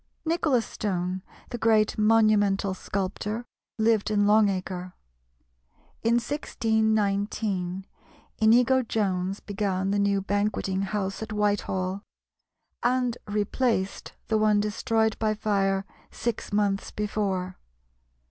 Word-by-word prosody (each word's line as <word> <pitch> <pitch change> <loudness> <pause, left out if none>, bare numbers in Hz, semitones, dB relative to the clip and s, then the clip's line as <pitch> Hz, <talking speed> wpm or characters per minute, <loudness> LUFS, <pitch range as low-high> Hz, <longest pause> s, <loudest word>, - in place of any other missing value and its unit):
Nicholas 315 -7 +1
Stone, 185 -2 -3 0.3
the 240 - -4
great 220 -2 +3
monumental 210 -3 +3
sculptor, 200 +4 -3 0.3
lived 220 -1 +2
in 205 -1 +2
Long 210 0 +5
Acre. 185 -1 -4 1.1
In 230 +1 +2
1619 215 -6 0 0.5
Inigo 245 +4 +5
Jones 195 -4 -1
began 195 -2 -1
the 205 - +1
new 200 0 +2
Banqueting 195 -1 -1
House 195 0 -2
at 220 - -5
Whitehall, 200 -2 -1 0.8
and 250 -1 +1
replaced 210 0 -1
the 220 -1 +2
one 215 -1 +4
destroyed 220 +1 0
by 215 -1 +1
fire 195 -2 0 0.2
six 235 -2 -4
months 205 -1 0
before. 195 -3 -2
210 Hz, 100 wpm, -26 LUFS, 195-220 Hz, 1.1 s, Long